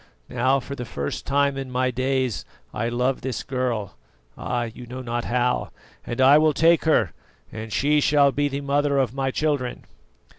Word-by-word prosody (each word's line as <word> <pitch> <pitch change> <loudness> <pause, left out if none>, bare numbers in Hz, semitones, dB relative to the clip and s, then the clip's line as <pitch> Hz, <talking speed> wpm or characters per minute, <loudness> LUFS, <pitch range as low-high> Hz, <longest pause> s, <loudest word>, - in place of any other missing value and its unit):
Now, 130 +2 +2
for 135 +2 -7
the 125 - -5
first 70 -11 -5
time 140 0 +2
in 135 -1 -5
my 130 0 0
days, 130 -1 -1 0.3
I 115 +2 -1
love 125 +2 0
this 130 -2 -3
girl 125 -7 -3 0.4
ah, 120 -1 -2
you 120 +1 -8
know 130 +2 -7
not 120 0 -3
how! 125 +1 0 0.3
and 120 - -5
I 135 +3 +7
will 155 0 +3
take 165 +3 +4
her, 160 - +3 0.4
and 110 0 -7
she 150 +4 +2
shall 145 -1 +4
be 145 +1 0
the 140 0 -3
mother 140 0 +1
of 130 -3 +1
my 135 0 -1
children." 140 -3 -2
130 Hz, 180 wpm, -24 LUFS, 125-140 Hz, 0.4 s, I